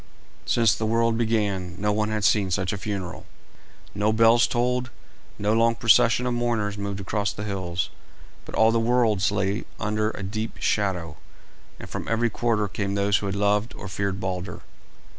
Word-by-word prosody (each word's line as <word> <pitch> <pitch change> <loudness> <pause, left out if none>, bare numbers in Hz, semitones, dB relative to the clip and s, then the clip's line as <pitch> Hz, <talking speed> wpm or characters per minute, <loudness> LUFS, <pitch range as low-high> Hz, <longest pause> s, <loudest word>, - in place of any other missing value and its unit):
Since 115 -3 +4
the 110 - -2
world 115 0 +2
began 100 -6 -1
no 105 +1 +1
one 105 +1 0
had 110 -1 -2
seen 100 -1 +3
such 95 +1 -1
a - - -3
funeral. 95 -3 -5 0.7
No 105 +1 +1
bells 115 +1 +5
tolled, 125 +1 0 0.5
no 105 +1 +1
long 115 +1 +3
procession 115 +2 +4
of 125 - 0
mourners 115 -4 -1
moved 100 -1 -4
across 100 +1 -1
the 105 - -6
hills, 95 -4 -3 0.5
but - - -8
all 110 0 +5
the 115 - +2
worlds 115 -4 +2
lay 100 +1 -1 0.2
under 105 0 0
a 100 - -6
deep 110 +3 -4
shadow, 90 -7 -1 0.6
and - - -8
from - - -6
every 115 0 +1
quarter 110 -3 0
came 100 +1 -3
those 100 0 +2
who 100 - -3
had 95 - -2
loved 105 +2 +1
or - - -8
feared 100 0 -2
Balder. 90 -2 -4
105 Hz, 175 wpm, -25 LUFS, 100-115 Hz, 0.7 s, bells